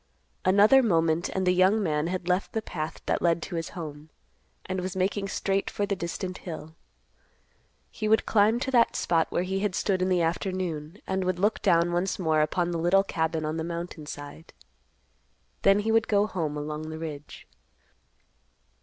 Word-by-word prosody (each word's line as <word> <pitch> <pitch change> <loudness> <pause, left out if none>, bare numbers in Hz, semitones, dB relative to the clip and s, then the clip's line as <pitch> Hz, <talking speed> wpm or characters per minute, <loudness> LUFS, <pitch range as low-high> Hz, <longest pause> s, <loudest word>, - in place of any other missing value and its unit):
Another 205 +8 +6
moment, 165 -6 +1
and 190 -1 -1
the 180 - +4
young 190 +4 +3
man 150 -2 0
had 180 0 -3
left 180 +2 0
the 220 - -1
path 155 -4 -5
that - - 0
led 170 -1 +2
to - - -7
his 165 -1 -3
home, 155 -2 -7 0.6
and 185 -1 -3
was 185 0 -4
making 195 +2 0
straight 195 0 -1
for 205 - -1
the 200 -1 -1
distant 180 +1 -5
hill. 160 -2 -8 1.2
He 215 - -3
would 220 +1 +3
climb 220 +2 +3
to 265 - -2
that 240 -3 +4
spot 165 -2 +1
where 175 - 0
he 190 +1 -2
had 200 -3 -1
stood 190 -2 0
in 185 - +1
the 180 -2 +2
afternoon, 170 -1 -2
and 190 0 -1
would 185 -1 0
look 205 +4 +1
down 170 -2 +3
once 180 +2 0
more 160 -4 +2
upon 175 +3 0
the 170 - -2
little 180 +4 +4
cabin 160 -4 -1
on 155 +1 -2
the 160 - -2
mountain 170 -2 -6
side. 145 +2 -9 1.1
Then 195 +1 +4
he 220 +2 0
would 225 0 +3
go 205 -1 +3
home 160 -8 -3
along 150 +1 -5
the 160 - -6
ridge. 150 -3 -8
180 Hz, 185 wpm, -27 LUFS, 160-195 Hz, 1.2 s, Another